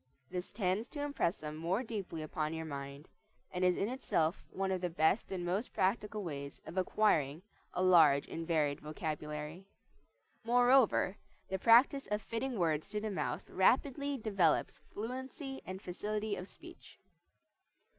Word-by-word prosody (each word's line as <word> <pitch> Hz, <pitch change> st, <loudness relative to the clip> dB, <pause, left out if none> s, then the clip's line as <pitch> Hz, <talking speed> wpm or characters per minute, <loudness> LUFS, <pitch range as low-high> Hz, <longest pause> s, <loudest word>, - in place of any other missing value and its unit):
This 180 Hz, 0 st, -4 dB
tends 200 Hz, +2 st, 0 dB
to 290 Hz, -, -5 dB
impress 285 Hz, -11 st, 0 dB
them 150 Hz, 0 st, -6 dB
more 175 Hz, +9 st, -1 dB
deeply 195 Hz, -9 st, -5 dB
upon 155 Hz, +1 st, -2 dB
your 160 Hz, 0 st, -4 dB
mind, 140 Hz, 0 st, -7 dB, 0.4 s
and 180 Hz, 0 st, -2 dB
is 180 Hz, -1 st, +4 dB
in 200 Hz, -, 0 dB
itself 190 Hz, -9 st, 0 dB
one 195 Hz, 0 st, -2 dB
of 185 Hz, -1 st, -1 dB
the 180 Hz, -, 0 dB
best 165 Hz, +6 st, +2 dB
and 180 Hz, -2 st, -3 dB
most 195 Hz, +7 st, -1 dB
practical 210 Hz, +2 st, 0 dB
ways 140 Hz, -4 st, -6 dB
of -, -, -8 dB
acquiring 180 Hz, -5 st, +2 dB, 0.3 s
a 180 Hz, -, +1 dB
large 160 Hz, -6 st, +6 dB
and 165 Hz, 0 st, -5 dB
varied 150 Hz, -4 st, +1 dB
vocabulary. 150 Hz, +3 st, -5 dB, 0.8 s
Moreover, 245 Hz, -4 st, +4 dB, 0.3 s
the 190 Hz, -, -2 dB
practise 245 Hz, +6 st, +5 dB
of 210 Hz, 0 st, 0 dB
fitting 230 Hz, +3 st, -3 dB
words 160 Hz, -1 st, 0 dB
to 210 Hz, +1 st, -2 dB
the 215 Hz, 0 st, -3 dB
mouth 195 Hz, -, -3 dB
rapidly 275 Hz, +7 st, +2 dB
develops 195 Hz, -8 st, +1 dB
fluency 260 Hz, +5 st, -5 dB
and 185 Hz, 0 st, -5 dB
facility 210 Hz, +3 st, -3 dB
of 180 Hz, -, -7 dB
speech. -, -, -14 dB
185 Hz, 150 wpm, -34 LUFS, 160-220 Hz, 0.8 s, large